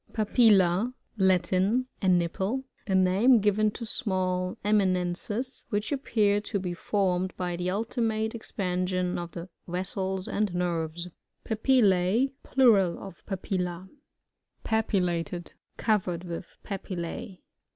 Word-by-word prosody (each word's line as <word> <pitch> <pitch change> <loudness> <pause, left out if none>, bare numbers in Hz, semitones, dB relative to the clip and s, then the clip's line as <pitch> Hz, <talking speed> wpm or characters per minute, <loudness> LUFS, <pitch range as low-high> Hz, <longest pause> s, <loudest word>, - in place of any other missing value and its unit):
Papilla. 215 -1 +4
— - - -40
Latin. 185 +7 +2 0.2
A 190 - 0
nipple. 185 +8 +1 0.2
A 190 - +1
name 190 +7 +5
given 210 +1 +3
to 230 +3 -7
smuU 185 -6 -1
eminences, 205 +4 0
which 210 +4 -1
appear 210 -7 +2
to 210 0 -3
be 180 -2 -3
formed 185 0 0
by 180 -1 -2
the 175 +1 -3
aiti 220 +6 -2
mate 220 -1 0
expansion 185 -5 -2
of 170 0 -6
the 170 +1 -6 0.2
vessels 190 +1 -3
and 210 -1 0
nervea 170 0 -2 0.3
PAPiLi^iE. 220 0 +3
— - - -47
Plural 210 -10 +4
ot 195 -3 -10
Papilla. 185 -2 -3 0.8
Papillated. 180 -6 0 0.2
— - - -47
Covered 185 -6 0
with 170 0 -7
Papille. 190 +2 -5
190 Hz, 120 wpm, -28 LUFS, 180-215 Hz, 0.8 s, name